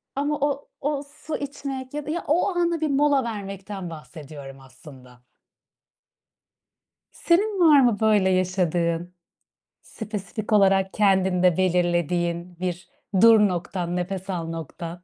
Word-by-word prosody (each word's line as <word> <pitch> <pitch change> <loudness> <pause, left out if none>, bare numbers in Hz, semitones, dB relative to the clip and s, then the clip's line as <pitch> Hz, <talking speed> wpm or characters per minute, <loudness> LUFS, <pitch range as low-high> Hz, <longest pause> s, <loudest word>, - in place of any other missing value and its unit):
Ama 290 +1 -1
o 285 -1 -1
o 290 0 -1
su 300 +2 -8
içmek 275 -2 -6
ya 295 -1 -4
da - - -6
ya, 345 - -3
o 340 +6 +2
ana 340 -2 0
bir 310 - +1
mola 280 -1 +3
vermekten 195 -4 -6
bahsediyorum 150 -4 -10
aslında. 130 -1 -16 1.9
Senin 390 +3 +1
var 310 -5 +7
mı 240 -5 +3
böyle 210 -4 +3
yaşadığın, 180 -2 0 0.7
spesifik 215 -1 -6
olarak 195 -2 +3
kendinde 190 -3 +3
belirlediğin 175 -1 0
bir 180 -1 -4 0.3
"dur" 230 -1 +8
noktan; 180 -2 -1
"nefes 190 +1 -4
al" 170 -3 -3
noktan? 165 +2 -7
190 Hz, 120 wpm, -24 LUFS, 175-270 Hz, 1.9 s, dur